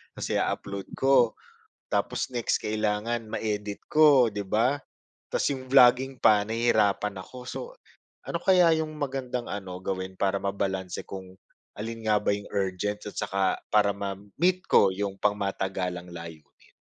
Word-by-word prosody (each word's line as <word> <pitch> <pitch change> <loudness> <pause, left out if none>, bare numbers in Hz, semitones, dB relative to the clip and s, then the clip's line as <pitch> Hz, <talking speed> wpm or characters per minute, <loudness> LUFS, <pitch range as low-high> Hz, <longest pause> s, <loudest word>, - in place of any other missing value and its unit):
'tas - - -5
i-u-upload 100 -1 -2
ko, 130 -4 +4 0.6
tapos - - 0
next 120 - +1
kailangan 110 +2 -1
ma-edit 105 -2 -3
ko 145 -6 +6
'di 105 - -3
ba, 120 +8 +2 0.5
'tas - - 0
'yong 130 -1 -5
vlogging 130 0 +5
pa 105 -1 +6
nahihirapan 110 -3 +1
ako. 125 - -12
So, - - -5 0.7
ano - - -1
kaya 180 -4 +5
'yong 155 -1 -2
magandang 130 -4 -3
ano 95 -3 -5
gawin, 95 -1 -4
para 100 0 +1
mabalanse 95 -2 -2
kung 95 -1 -8 0.4
alin 115 +2 -5
nga 105 - +5
ba - - +1
'yong 100 0 -5
urgent 100 +1 -1
at - - -13
saka 95 -1 0 0.2
para 105 -1 +5
ma-meet 100 - -1
ko 100 - +6
'yong 100 0 -3
pangmatagalang 95 -3 -1
layunin? 85 -3 -11
105 Hz, 140 wpm, -27 LUFS, 95-125 Hz, 0.7 s, ko